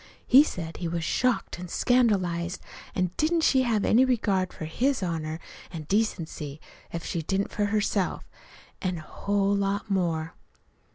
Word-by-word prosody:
He 265 - +8
said 165 - -5
he 175 - -3
was 170 0 -2
shocked 250 0 0
an' 180 - -6
scandalized, 185 -7 +1 0.4
an' 185 -2 +1
didn't 325 +2 +2
she 265 -4 +4
have 225 -5 +1
any 240 +4 +5
regard 205 -7 +1
for 155 - -7
his 250 - 0
honor 160 -2 -3 0.3
an' 165 -3 -6
decency, 160 -6 -2 0.3
if 170 -1 -5
she 170 - -2
didn't 195 +5 -1
for 205 - 0
herself! 205 -2 0 0.5
An', 185 -1 -1
oh, - - -6
a - - -13
whole 200 +4 0
lot 200 +1 -1
more. 165 -4 0
190 Hz, 160 wpm, -27 LUFS, 170-220 Hz, 0.5 s, He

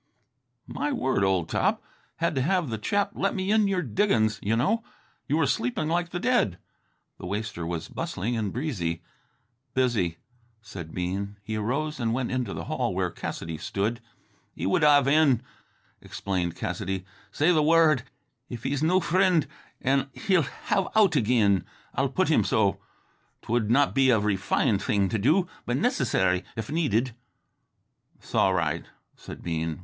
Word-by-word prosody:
"My 295 - -3
word, 130 - 0
old 95 -4 +1
top, - - 0 0.3
had 170 0 0
to 135 - 0
have 170 -2 +1
the 110 - -3
chap 200 - 0
let 195 - -1
me 190 +1 -1
into 215 -1 +4
your 190 -2 0
diggin's 110 - +1
you 110 +3 +1
know. 215 - +1 0.4
You 150 - +1
were 160 - +3
sleeping 135 +2 -1
like 175 +1 0
the 175 - -4
dead." 180 - +2 0.6
The - - -6
waster 105 -4 -3
was 85 -2 -4
bustling 115 +7 -3
and 105 -4 -1
breezy. 95 - -3 0.7
"Busy," 110 -10 +1 0.4
said 95 -7 -9
Bean. 95 +4 -3
He 110 +2 -4
arose 140 +8 -2
and 115 -1 0
went 130 -1 -2
into 125 -5 -1
the - - -5
hall - - -2
where - - 0
Cassidy 80 -1 -5
stood. 110 +4 -2 0.5
"He - - -4
would 95 - +2
have 145 -2 +5
in," 140 -5 +4 0.6
explained 90 -3 -3
Cassidy. 95 -2 -3 0.3
"Say 155 +5 +3
th' 155 - +3
wor 165 +1 +5
r 155 - +4
d 125 - -9 0.5
if 120 -1 -7
he's 140 +1 -1
no 180 +4 +3
frind, 180 -1 +3 0.4
an' 135 +1 +1
he'll 190 -5 +2 0.3
have 195 -1 +2
out 205 -7 +5
agin. 105 - +3 0.3
I'll - - +1
put - - +1
him - - +4
so. - - +1 0.6
'T - - -8
would 115 -3 +1
not 135 +4 +3
be 135 -1 +4
a 115 -3 +5
refined 105 0 +1
thing 100 -4 +1
to 110 - -1
do, 160 - +3 0.2
but 120 +1 0
nicissary 105 - +1
if 110 +4 -5
needed." 130 -7 +1 1.1
"'S - - -16
all - - +3
right," - - 0 0.3
said - - -10
Bean. 80 -1 -2
120 Hz, 165 wpm, -26 LUFS, 100-155 Hz, 1.1 s, have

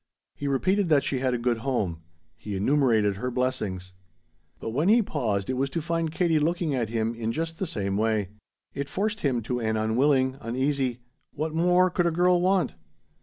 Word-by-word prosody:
He 145 - -5
repeated 185 +8 +1
that 145 -3 +4
she 135 -2 -1
had 130 -1 0
a - - 0
good 120 -1 0
home. 105 -10 -2 0.3
He 105 +3 -6
enumerated 110 -3 +2
her 125 +4 -2
blessings. 105 -8 -2 0.7
But 115 - -4
when 150 - +1
he 230 +1 +5
paused 110 - -1
it 130 - -1
was 135 +1 0
to 150 - -2
find 165 0 -1
Katie 165 -2 +2
looking 165 0 0
at 120 -5 -1
him 115 0 -1
in 115 -1 -3
just 165 +4 -4
the 190 - -1
same 100 -8 -2
way. 110 -3 0 0.4
It 140 0 -4
forced 215 +2 -1
him 125 -5 0
to 125 +2 -2
an 110 -1 0
unwilling, 130 +4 +2
uneasy: 130 0 -1 0.3
"What 155 +1 -2
more 180 +2 +3
could 175 -1 +1
a - - +1
girl 175 +1 +3
want?" 185 - +2
130 Hz, 190 wpm, -26 LUFS, 115-165 Hz, 0.7 s, he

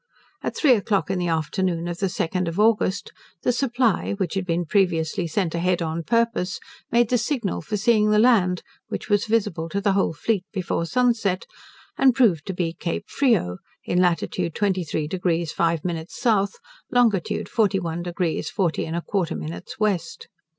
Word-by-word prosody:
At - - -4
three 295 - +4
o'clock 200 -3 0
in 190 - -1
the 175 - -1
afternoon 170 +2 -1
of 175 0 -4
the 195 - +1
2nd 180 0 -1
of 165 +4 -3
August, 210 -3 +2 0.3
the - - +3
'Supply', 240 -5 +1
which 195 -3 -2
had 190 -2 -2
been 170 0 0
previously 170 -2 +1
sent 165 0 -1
a 170 - -1
head 180 0 +1
on 160 +1 -2
purpose, 230 -2 0 0.3
made 235 0 +3
the 245 - +3
signal 230 - -1
for 210 +6 -3
seeing 215 0 +3
the 210 - +4
land, 210 -6 +4 0.2
which - - -5
was 205 0 +3
visible 205 -7 0
to 200 - -1
the 200 0 +2
whole 195 -4 +1
fleet 195 +4 -1
before 175 -3 -2
sunset, 230 -5 +1 0.5
and 260 -3 +5
proved 210 - +3
to 190 - -2
be 170 -2 -1
Cape 175 +4 -4
Frio, 220 - +1 0.3
in 180 - +2
latitude 175 -1 0
23 180 -7 -1
deg 175 -1 0
5 165 0 0
min 165 -2 -3
south, 200 -4 +1 0.3
longitude 225 -8 +1
41 190 -6 0
deg 175 0 -6 0.3
40 180 -6 -1
1/4 170 - -2
min 80 +3 -5 0.2
west. 185 -6 -1
185 Hz, 170 wpm, -23 LUFS, 170-215 Hz, 0.5 s, and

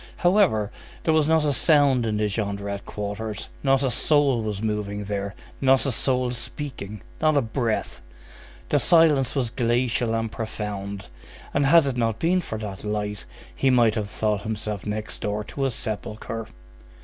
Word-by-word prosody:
However, 175 - +3 0.3
there 160 - +2
was 155 -2 +3
not 160 -1 +3
a 145 - +2
sound 140 -5 +4
in 105 -1 0
the 105 0 +1
Jondrette 100 -1 -3
quarters, 105 +1 -5
not 135 0 +3
a 130 - +1
soul 140 -1 +3
was 105 -2 -3
moving 105 -1 -2
there, 100 0 -3 0.3
not 135 0 +4
a 135 - +1
soul 125 0 +1
speaking, 115 -4 -6 0.2
not 155 -1 +4
a - - +5
breath; 115 -1 -2 0.7
the - - +3
silence 160 -6 +4
was 125 -5 0
glacial 120 -1 +1
and 115 -1 -2
profound, 100 -3 -5 0.5
and 140 -1 +2
had 165 +1 +6
it 135 -3 -2
not 115 -2 +1
been 180 +7 +2
for 110 - -5
that 105 -3 -6
light, 105 -1 -3 0.3
he 135 - +2
might 120 -4 +4
have 105 -2 -3
thought 105 -2 -1
himself 105 -2 -4
next 105 +1 -4
door 105 0 -2
to 135 +5 -3
a - - +2
sepulchre. 110 0 -4
115 Hz, 165 wpm, -24 LUFS, 105-135 Hz, 0.7 s, had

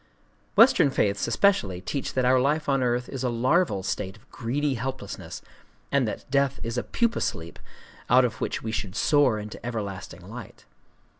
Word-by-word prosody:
Western - - +6
faiths 100 -6 0
especially 115 - +2
teach 135 +9 -4
that 130 -1 +2
our 130 +1 +5
life 150 +3 +1
on 135 -1 +2
earth 125 0 0
is 130 -2 -5
a 125 - +1
larval 120 - +1
state 95 +1 -3
of 120 +5 -24
greedy 140 +5 -1
helplessness, 130 -3 -6 0.5
and 140 -4 +2
that - - -5
death 140 -1 +2
is 115 0 -3
a 120 - 0
pupa 235 -1 0
sleep 80 +1 -4 0.5
out 125 +1 +6
of 120 - -4
which - - -2
we 110 - -3
should 100 -4 -4
soar 145 -7 +3
into 105 0 -8
everlasting 105 -6 -5
light. - - -10
125 Hz, 170 wpm, -26 LUFS, 105-140 Hz, 0.5 s, Western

